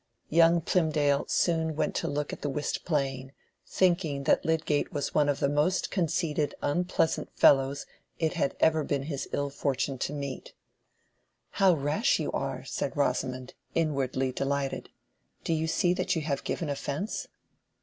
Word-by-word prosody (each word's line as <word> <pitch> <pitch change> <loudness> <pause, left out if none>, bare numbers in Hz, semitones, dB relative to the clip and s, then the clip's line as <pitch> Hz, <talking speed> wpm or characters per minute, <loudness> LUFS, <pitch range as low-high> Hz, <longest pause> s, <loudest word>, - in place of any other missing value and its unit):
Young 165 +1 +5
Plymdale 150 -5 +1
soon 160 -2 +1
went - - 0
to 165 - -1
look 145 -1 -2
at - - -8
the 145 - -2
whist 145 +2 -3
playing, 135 -4 -1 0.3
thinking 170 -6 +1
that - - +3
Lydgate 160 -1 0
was 145 -5 -3
one 145 -1 +3
of 140 - 0
the - - +2
most 150 +6 +1
conceited, 160 -4 0
unpleasant 170 +2 0
fellows 135 0 +4 0.3
it 160 -1 0
had 165 -5 0
ever 160 -1 +3
been 140 -1 -1
his 140 -2 -4
ill 145 0 -1
fortune 135 -1 -1
to - - -2
meet. 140 -3 -6 1.0
"How 190 -2 +4
rash 150 - +1
you - - -2
are!" - - -3
said - - -3
Rosamond, 130 -2 -1 0.2
inwardly 135 -5 0
delighted. 140 +1 -2 0.5
"Do 165 - 0
you 160 0 0
see 175 +2 +2
that 180 - 0
you 160 - -1
have 140 -2 -2
given 170 - -2
offence?" 145 +7 -3
145 Hz, 155 wpm, -28 LUFS, 140-165 Hz, 1.0 s, Young